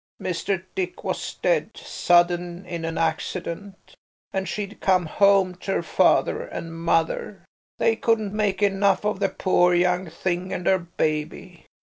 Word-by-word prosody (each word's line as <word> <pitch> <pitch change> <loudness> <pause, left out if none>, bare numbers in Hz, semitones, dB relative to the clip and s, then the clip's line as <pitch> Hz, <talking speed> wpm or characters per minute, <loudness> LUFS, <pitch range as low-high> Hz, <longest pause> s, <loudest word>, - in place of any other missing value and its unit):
Mr. 185 +1 -2
Dick 185 -1 -4
was - - -3
dead, - - +1
sudden 175 +1 +1
in 170 -2 -5
a 165 0 -3
accident, 170 +4 -3 0.4
and 190 0 -2
she'd 210 0 -5
come 185 -2 +3
home 195 +2 +3
to 190 +2 -4
her - - 0
father 450 - +2
and 170 - -7
mother. 165 +3 -1 0.3
They 225 -1 +2
couldn't 220 -4 0
make 210 -2 0
enough 200 0 +2
of 210 -2 0
the 195 -1 +1
poor 180 -1 +2
young 180 0 +1
thing 180 +2 -3
and 180 - -4
her 190 -1 +4
baby. 165 +1 -4
185 Hz, 145 wpm, -24 LUFS, 175-200 Hz, 0.4 s, her